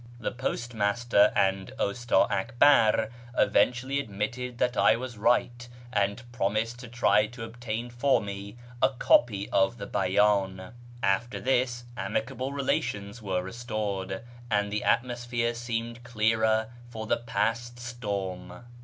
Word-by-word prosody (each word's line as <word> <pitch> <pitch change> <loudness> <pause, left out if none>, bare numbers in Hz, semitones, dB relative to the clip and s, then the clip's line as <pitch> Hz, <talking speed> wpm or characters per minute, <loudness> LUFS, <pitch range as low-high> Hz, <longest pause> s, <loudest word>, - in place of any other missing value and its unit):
The - - -2
postmaster 120 -3 +1
and 95 -2 +1
Ustii 120 +4 +2
Akbar 110 +1 +4 0.3
eventually 130 +3 +2
admitted 120 +2 -4
that 125 0 +1
I - - +5
was 125 0 -6
right, 120 +2 +1 0.2
and 100 +2 0
promised 115 +1 -1
to 125 - -9
try 110 -3 +3
to 120 +1 -9
obtain 115 +1 -5
for 130 +3 +2
me 100 +2 -7 0.2
a 130 - +5
copy 120 -5 +3
of 95 0 +2
the - - -6
Bcydn. 95 0 +1 0.3
After 100 +6 +1
this, 125 -1 0
amicable 125 +6 -3
relations 120 -6 -2
were 95 -3 -1
restored, 105 -2 -4 0.3
and 105 -2 +1
the 105 - -1
atmosphere 120 -1 0
seemed 115 0 -4
clearer 110 -1 +1 0.2
for 110 -2 -6
the - - +1
past 120 0 -2
storm. 105 -5 -5
115 Hz, 125 wpm, -28 LUFS, 100-120 Hz, 0.3 s, I